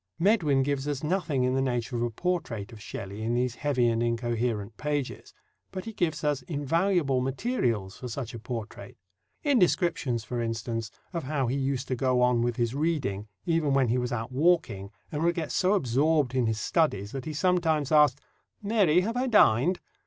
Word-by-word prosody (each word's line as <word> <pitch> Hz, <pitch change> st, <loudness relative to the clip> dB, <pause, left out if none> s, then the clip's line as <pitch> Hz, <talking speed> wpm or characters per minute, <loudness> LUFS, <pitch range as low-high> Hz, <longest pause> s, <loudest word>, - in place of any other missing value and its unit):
Medwin 165 Hz, -9 st, +3 dB
gives 140 Hz, 0 st, -1 dB
us 145 Hz, -1 st, -2 dB
nothing 155 Hz, -5 st, 0 dB
in 125 Hz, 0 st, +1 dB
the 135 Hz, -, +1 dB
nature 120 Hz, -1 st, -1 dB
of 120 Hz, -, -1 dB
a 120 Hz, -, +1 dB
portrait 125 Hz, -, -3 dB
of 110 Hz, -, -11 dB
Shelley 100 Hz, 0 st, -7 dB
in 115 Hz, +2 st, 0 dB
these 125 Hz, 0 st, 0 dB
heavy 130 Hz, -3 st, +1 dB
and 115 Hz, 0 st, +1 dB
incoherent 115 Hz, -2 st, -1 dB
pages; 145 Hz, -1 st, -3 dB, 0.4 s
but 185 Hz, -, -6 dB
he 225 Hz, -, -6 dB
gives 160 Hz, -6 st, -1 dB
us 145 Hz, -2 st, +1 dB
invaluable 150 Hz, -1 st, +1 dB
materials 125 Hz, -, -1 dB
for 125 Hz, -, -6 dB
such 125 Hz, 0 st, -5 dB
a 115 Hz, -, -6 dB
portrait 115 Hz, -1 st, -7 dB, 0.5 s
in 285 Hz, -5 st, +3 dB
descriptions, 165 Hz, -, +1 dB
for 120 Hz, +1 st, -3 dB
instance, 115 Hz, -1 st, -3 dB, 0.2 s
of 170 Hz, -5 st, -3 dB
how 140 Hz, -1 st, 0 dB
he 125 Hz, +3 st, -1 dB
used 135 Hz, -1 st, -1 dB
to 130 Hz, -, 0 dB
go 130 Hz, 0 st, +1 dB
on 125 Hz, -1 st, +3 dB
with 120 Hz, 0 st, 0 dB
his 120 Hz, -1 st, 0 dB
reading, 135 Hz, -10 st, -1 dB, 0.2 s
even 160 Hz, -4 st, +1 dB
when 135 Hz, -3 st, +3 dB
he 125 Hz, +2 st, +2 dB
was 125 Hz, 0 st, -2 dB
out 115 Hz, 0 st, -3 dB
walking, 130 Hz, -, +1 dB, 0.2 s
and 150 Hz, -, -3 dB
would 170 Hz, +1 st, +2 dB
get 160 Hz, -4 st, -3 dB
so 185 Hz, +2 st, +2 dB
absorbed 145 Hz, -, +2 dB
in 125 Hz, -3 st, +1 dB
his 110 Hz, -1 st, -1 dB
studies 105 Hz, -, 0 dB
that 135 Hz, -2 st, -5 dB
he 155 Hz, -, -4 dB
sometimes 160 Hz, -3 st, +1 dB
asked, 150 Hz, -3 st, +5 dB, 0.4 s
"Mary, 200 Hz, -6 st, +3 dB
have 225 Hz, +5 st, -2 dB
I 255 Hz, +1 st, 0 dB
dined?" 180 Hz, -, +4 dB
135 Hz, 190 wpm, -28 LUFS, 120-160 Hz, 0.5 s, asked